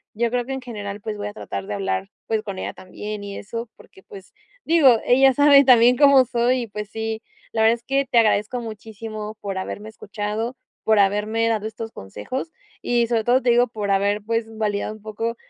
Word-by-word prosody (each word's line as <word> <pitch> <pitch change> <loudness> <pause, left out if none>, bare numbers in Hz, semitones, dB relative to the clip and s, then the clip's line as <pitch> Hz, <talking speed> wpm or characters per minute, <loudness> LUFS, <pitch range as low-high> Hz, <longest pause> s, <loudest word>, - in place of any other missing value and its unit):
Yo 235 +1 0
creo 245 0 0
que 270 - -4
en 265 - -4
general, 205 -4 -7
pues, 215 0 -5
voy 205 0 -4
a 205 - -7
tratar 100 - -6
de 105 - -3
hablar, 95 -1 -2 0.2
pues, 220 -1 0
con 200 -3 -6
ella - - -4
también 210 +2 -7
y 200 -1 -6
eso, 230 +3 -6
porque, 190 - -18
pues, 195 -1 -13 0.3
digo, 290 -8 +6
ella 265 +2 +5
sabe 285 +1 +7
también 250 -1 +6
cómo 280 -2 +6
soy 245 +1 +1
y, - - -7
pues, 210 0 -6
sí. 220 0 -4 0.3
La 220 - 0
verdad 225 +1 +5
es 235 - -16
que 275 +2 0
te - - +1
agradezco 220 +1 +2
muchísimo 215 -1 -7
por 195 -2 -4
haberme 205 +3 -6
escuchado, 215 +3 -4 0.3
por 220 -1 +3
haberme 210 +3 +2
dado 220 -2 0
estos 225 0 -7
consejos 105 - -6 0.3
y, 240 -1 +1
sobre 225 -1 0
todo, 245 +3 +3
te 245 - +3
digo, 240 +1 +4
por 210 -4 -3
haber, 200 +1 +1
pues, 230 +1 -1
validado 210 -1 -1
un 215 - -16
poco, 220 +2 -4
220 Hz, 210 wpm, -22 LUFS, 205-240 Hz, 0.3 s, sabe